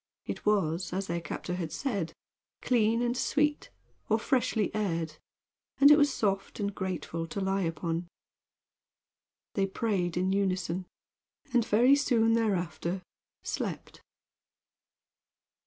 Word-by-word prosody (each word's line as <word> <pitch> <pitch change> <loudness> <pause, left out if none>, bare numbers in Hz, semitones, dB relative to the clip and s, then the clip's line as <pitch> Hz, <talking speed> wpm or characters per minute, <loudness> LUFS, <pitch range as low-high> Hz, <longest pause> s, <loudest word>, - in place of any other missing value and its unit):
It - - -5
was, 180 -4 +1
as 195 +1 -1
their 170 -1 -2
captor 170 +2 -5
had 170 -3 -3
said, 200 - -2 0.5
clean 230 -1 +3
and 240 0 0
sweet, 295 +3 +1 0.4
or 220 - +4
freshly 225 -3 +1
aired, 165 -7 -2 0.6
and 285 +1 +8
it - - +10
was 290 -1 +4
soft 195 -5 -1
and 200 -1 -1
grateful 170 -3 -3
to 180 - -4
lie 195 0 0
upon. 165 0 -2 1.5
They 195 -1 +1
prayed 190 -4 -1
in 185 +1 +1
unison, 185 -2 -1 0.7
and 240 -1 +4
very 235 +5 +5
soon 230 -5 +3
thereafter 185 -4 -1 0.4
slept. - - -4
195 Hz, 120 wpm, -30 LUFS, 175-225 Hz, 1.5 s, it